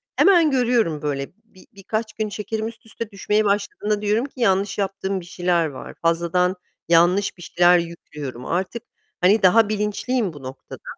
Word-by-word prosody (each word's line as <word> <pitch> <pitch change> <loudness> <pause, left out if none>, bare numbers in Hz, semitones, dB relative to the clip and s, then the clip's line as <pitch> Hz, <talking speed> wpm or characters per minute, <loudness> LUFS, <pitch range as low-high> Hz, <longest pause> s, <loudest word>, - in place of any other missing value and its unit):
hemen 345 -6 +5
görüyorum 235 - +1
böyle. 140 -2 -2 0.2
Bi 205 -5 -20
birkaç 215 +3 -4
gün 215 0 -3
şekerim 215 +2 -4
üst 225 0 -11
üste 225 0 -6
düşmeye 210 +2 0
başladığında 205 +1 -1
diyorum 210 +4 +1
ki: 275 -2 -13
"Yanlış 195 -2 +2
yaptığım 195 -1 -2
bir - - -13
şeyler 175 -1 0
var. 140 -3 -9
Fazladan 170 +2 +1 0.3
yanlış 175 +4 +3
bir - - -14
şeyler 175 +1 +4
yüklüyorum." 150 -7 -7
Artık, 190 +7 -2 0.4
hani, 195 +4 +4
daha 210 +3 +5
bilinçliyim 210 -1 -1
bu - - -11
Eee, - - -15
noktada. 130 +1 -10
195 Hz, 165 wpm, -22 LUFS, 175-220 Hz, 0.4 s, hemen